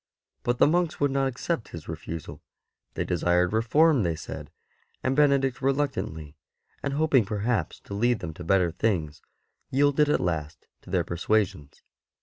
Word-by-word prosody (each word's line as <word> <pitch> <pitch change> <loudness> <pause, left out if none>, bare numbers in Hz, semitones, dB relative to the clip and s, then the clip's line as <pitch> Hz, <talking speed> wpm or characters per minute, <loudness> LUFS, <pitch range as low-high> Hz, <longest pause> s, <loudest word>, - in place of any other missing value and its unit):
But 120 0 0
the - - +6
monks 170 +1 +1
would 145 -1 +2
not 135 0 +1
accept 130 0 -3
his 80 -2 -9
refusal," 80 0 -7 0.5
they - - -1
desired 90 +1 +1
reform, 140 +6 +4
they 85 -4 0
said; - - -8 0.5
and 130 +1 +1
Benedict 140 -3 +3
reluctantly, 130 - -1 0.5
and 140 - -2
hoping 145 -4 +3
perhaps 105 -3 -2
to - - -10
lead 120 +4 +2
them 80 - -6
to 90 - -9
better 90 0 +2
things, 85 -5 -1 0.5
yielded 145 +2 +3
at - - +3
last 80 -4 -3 0.2
to - - -15
their 90 -2 +1
persuasions. 90 -2 -1
110 Hz, 150 wpm, -26 LUFS, 85-135 Hz, 0.5 s, the